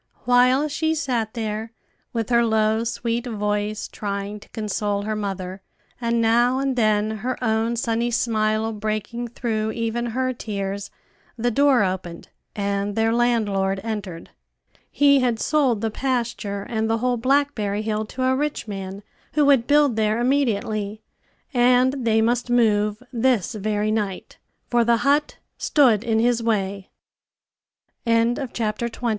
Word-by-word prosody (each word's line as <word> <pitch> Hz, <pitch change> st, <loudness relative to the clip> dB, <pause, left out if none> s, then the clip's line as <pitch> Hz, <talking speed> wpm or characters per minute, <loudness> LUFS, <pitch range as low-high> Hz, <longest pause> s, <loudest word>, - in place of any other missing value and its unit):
While 255 Hz, +4 st, +4 dB
she 315 Hz, +2 st, 0 dB
sat 245 Hz, -7 st, -2 dB
there, 220 Hz, 0 st, -4 dB, 0.4 s
with 230 Hz, -1 st, -2 dB
her 235 Hz, 0 st, +5 dB
low, 220 Hz, 0 st, +2 dB
sweet 235 Hz, +1 st, -2 dB
voice, 210 Hz, -1 st, -2 dB
trying 200 Hz, 0 st, -4 dB
to -, -, -17 dB
console 205 Hz, -1 st, -2 dB
her 215 Hz, +1 st, -2 dB
mother, 195 Hz, -2 st, -4 dB, 0.4 s
and 235 Hz, 0 st, +1 dB
now 240 Hz, +3 st, +3 dB
and 270 Hz, -1 st, 0 dB
then 215 Hz, -2 st, +1 dB
her 250 Hz, +4 st, -3 dB
own 225 Hz, +1 st, +1 dB
sunny 235 Hz, 0 st, 0 dB
smile 220 Hz, -1 st, 0 dB
breaking 215 Hz, +3 st, -3 dB
through 220 Hz, -2 st, -2 dB
even 230 Hz, +1 st, -2 dB
her 255 Hz, +2 st, -1 dB
tears, 200 Hz, -3 st, -4 dB, 0.5 s
the 240 Hz, +1 st, 0 dB
door 275 Hz, -1 st, +4 dB
opened, 185 Hz, -3 st, -4 dB, 0.3 s
and 200 Hz, 0 st, -1 dB
their 225 Hz, 0 st, +2 dB
landlord 205 Hz, -5 st, +1 dB
entered. 205 Hz, -7 st, -5 dB, 0.6 s
He 280 Hz, -1 st, +4 dB
had 245 Hz, -3 st, +1 dB
sold 265 Hz, -8 st, +1 dB
the 225 Hz, -1 st, -1 dB
pasture 235 Hz, -5 st, -2 dB
and 220 Hz, -1 st, -1 dB
the 225 Hz, -, +2 dB
whole 245 Hz, +1 st, 0 dB
blackberry 240 Hz, -5 st, +1 dB
hill 215 Hz, 0 st, -1 dB
to 255 Hz, +4 st, -5 dB
a 260 Hz, 0 st, +3 dB
rich 295 Hz, -3 st, -2 dB
man 195 Hz, 0 st, -6 dB, 0.3 s
who 300 Hz, -1 st, +3 dB
would 270 Hz, -4 st, +4 dB
build 290 Hz, -5 st, +4 dB
there 215 Hz, +1 st, +1 dB
immediately; 220 Hz, -5 st, 0 dB, 0.5 s
and 250 Hz, +1 st, +3 dB
they 220 Hz, 0 st, +3 dB
must 240 Hz, +2 st, 0 dB
move 215 Hz, -2 st, +2 dB
this 245 Hz, -2 st, +1 dB
very 215 Hz, 0 st, -1 dB
night, 205 Hz, -4 st, -3 dB, 0.3 s
for 240 Hz, -1 st, +3 dB
the 235 Hz, 0 st, +3 dB
hut 290 Hz, +2 st, +2 dB, 0.2 s
stood 240 Hz, -8 st, +3 dB
in 225 Hz, -2 st, +1 dB
his 235 Hz, +1 st, +2 dB
way. 200 Hz, -4 st, -1 dB, 1.2 s
CHAPTER 230 Hz, -1 st, 0 dB
XXI. 235 Hz, +1 st, -3 dB
225 Hz, 140 wpm, -23 LUFS, 210-245 Hz, 1.2 s, her